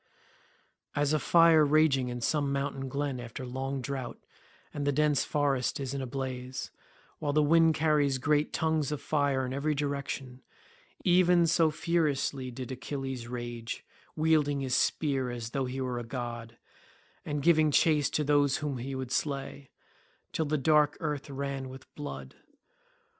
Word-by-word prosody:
As 145 Hz, +1 st, +1 dB
a 155 Hz, -, +3 dB
fire 165 Hz, 0 st, +6 dB
raging 145 Hz, -4 st, +3 dB
in 120 Hz, 0 st, -5 dB
some 145 Hz, +2 st, 0 dB
mountain 140 Hz, -1 st, -2 dB
glen 140 Hz, -1 st, -2 dB
after 120 Hz, +2 st, -7 dB
long 135 Hz, +1 st, -4 dB
drought—and 140 Hz, +2 st, -7 dB
the -, -, +4 dB
dense 150 Hz, 0 st, +2 dB
forest 140 Hz, -2 st, 0 dB
is 135 Hz, -1 st, -3 dB
in 140 Hz, -, -3 dB
a 130 Hz, -, -4 dB
blaze, 130 Hz, 0 st, -5 dB, 0.5 s
while 145 Hz, -1 st, -1 dB
the 150 Hz, 0 st, +4 dB
wind 165 Hz, +1 st, +5 dB
carries 150 Hz, -3 st, +2 dB
great 150 Hz, +3 st, +1 dB
tongues 160 Hz, -3 st, 0 dB
of 150 Hz, -, -2 dB
fire 140 Hz, -3 st, 0 dB
in 130 Hz, -, -4 dB
every 150 Hz, +2 st, 0 dB
direction—even 170 Hz, -, -1 dB
so 165 Hz, 0 st, +3 dB
furiously 150 Hz, -5 st, 0 dB
did 125 Hz, +1 st, -7 dB
Achilles 130 Hz, -2 st, -5 dB
rage, 120 Hz, -1 st, -5 dB, 0.3 s
wielding 155 Hz, -3 st, +2 dB
his 130 Hz, -2 st, 0 dB
spear 135 Hz, -4 st, +1 dB
as 120 Hz, -2 st, -5 dB
though 135 Hz, -1 st, -1 dB
he 130 Hz, +1 st, -4 dB
were 125 Hz, -2 st, -2 dB
a -, -, -5 dB
god, 120 Hz, -1 st, -6 dB, 0.7 s
and 145 Hz, -1 st, -3 dB
giving 155 Hz, -2 st, +5 dB
chase 150 Hz, 0 st, +3 dB
to 150 Hz, -, 0 dB
those 145 Hz, -2 st, +3 dB
whom 145 Hz, -4 st, -3 dB
he 135 Hz, +3 st, -4 dB
would 130 Hz, -1 st, -5 dB
slay, 140 Hz, -1 st, -3 dB, 0.6 s
till 160 Hz, -, 0 dB
the 155 Hz, +1 st, 0 dB
dark 150 Hz, +1 st, +3 dB
earth 150 Hz, -2 st, -3 dB
ran 135 Hz, -1 st, -4 dB
with 130 Hz, +1 st, -11 dB
blood. 145 Hz, -1 st, -7 dB
140 Hz, 155 wpm, -29 LUFS, 130-150 Hz, 0.7 s, fire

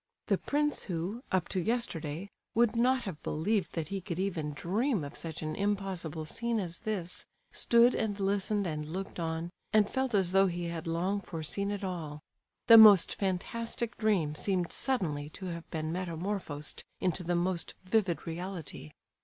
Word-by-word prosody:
The -, -, +3 dB
prince 295 Hz, +1 st, 0 dB
who, 185 Hz, +5 st, -3 dB
up 185 Hz, -2 st, +2 dB
to 185 Hz, -, 0 dB
yesterday, 190 Hz, -6 st, -2 dB, 0.2 s
would 235 Hz, 0 st, +4 dB
not 255 Hz, +2 st, +3 dB
have 180 Hz, -7 st, -6 dB
believed 195 Hz, +6 st, 0 dB
that 165 Hz, -1 st, -3 dB
he 195 Hz, -1 st, -3 dB
could 170 Hz, -2 st, -4 dB
even 170 Hz, -6 st, -1 dB
dream 210 Hz, -, 0 dB
of 140 Hz, -, -7 dB
such 160 Hz, -1 st, -5 dB
an 155 Hz, 0 st, -2 dB
impossible 195 Hz, -6 st, -2 dB
scene 235 Hz, +7 st, -1 dB
as 170 Hz, -4 st, -4 dB
this, 200 Hz, -6 st, -3 dB, 0.2 s
stood 235 Hz, +1 st, +5 dB
and 205 Hz, -2 st, -1 dB
listened 200 Hz, +1 st, +1 dB
and 155 Hz, -3 st, -3 dB
looked 190 Hz, +2 st, -5 dB
on, 165 Hz, +1 st, -2 dB, 0.2 s
and 215 Hz, -1 st, +5 dB
felt 260 Hz, -3 st, -1 dB
as 190 Hz, -3 st, +3 dB
though 195 Hz, +1 st, +5 dB
he 175 Hz, -1 st, -3 dB
had 165 Hz, -1 st, -5 dB
long 180 Hz, +5 st, 0 dB
foreseen 185 Hz, +3 st, -3 dB
it 205 Hz, 0 st, -3 dB
all. 165 Hz, -6 st, -4 dB, 0.5 s
The 230 Hz, -1 st, +10 dB
most 205 Hz, -5 st, +9 dB
fantastic 230 Hz, +5 st, -2 dB
dream 195 Hz, -9 st, +1 dB
seemed 180 Hz, +2 st, 0 dB
suddenly 155 Hz, -, -1 dB
to 190 Hz, -, -7 dB
have 170 Hz, 0 st, -8 dB
been 155 Hz, -1 st, -3 dB
metamorphosed 170 Hz, -3 st, -3 dB, 0.2 s
into 180 Hz, -1 st, 0 dB
the 175 Hz, +1 st, 0 dB
most 175 Hz, 0 st, -1 dB
vivid 185 Hz, -2 st, +1 dB
reality. 170 Hz, -, -6 dB
185 Hz, 165 wpm, -31 LUFS, 165-210 Hz, 0.5 s, The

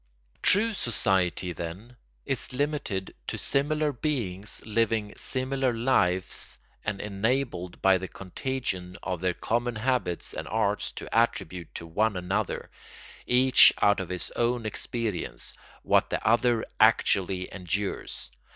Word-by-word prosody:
] -, -, -37 dB
True 225 Hz, +3 st, +3 dB
society, 95 Hz, -, 0 dB
then, 90 Hz, +9 st, -7 dB, 0.3 s
is -, -, -1 dB
limited 140 Hz, -9 st, -2 dB
to -, -, -3 dB
similar 150 Hz, +2 st, +1 dB
beings 115 Hz, -9 st, -3 dB
living 110 Hz, -1 st, 0 dB
similar 130 Hz, 0 st, -1 dB
lives 100 Hz, -7 st, +1 dB, 0.3 s
and 105 Hz, -2 st, -2 dB
enabled 105 Hz, -3 st, -1 dB
by 95 Hz, -1 st, +5 dB
the 95 Hz, -, -5 dB
contagion 95 Hz, -3 st, -4 dB
of 90 Hz, -2 st, -3 dB
their 90 Hz, -1 st, 0 dB
common 120 Hz, +1 st, -1 dB
habits 115 Hz, -6 st, -1 dB
and -, -, -5 dB
arts -, -, 0 dB
to -, -, -7 dB
attribute 85 Hz, 0 st, 0 dB
to 85 Hz, -, -5 dB
one 105 Hz, +5 st, 0 dB
another, 95 Hz, +3 st, -2 dB, 0.6 s
each 130 Hz, +1 st, +7 dB
out 100 Hz, -1 st, +4 dB
of 95 Hz, -, -4 dB
his 90 Hz, -1 st, -3 dB
own 120 Hz, -1 st, 0 dB
experience, 110 Hz, -3 st, -3 dB, 0.3 s
what -, -, +3 dB
the -, -, -2 dB
other 120 Hz, 0 st, +3 dB
actually 95 Hz, -1 st, +3 dB
endures. 95 Hz, -8 st, -3 dB
105 Hz, 125 wpm, -27 LUFS, 90-125 Hz, 0.6 s, each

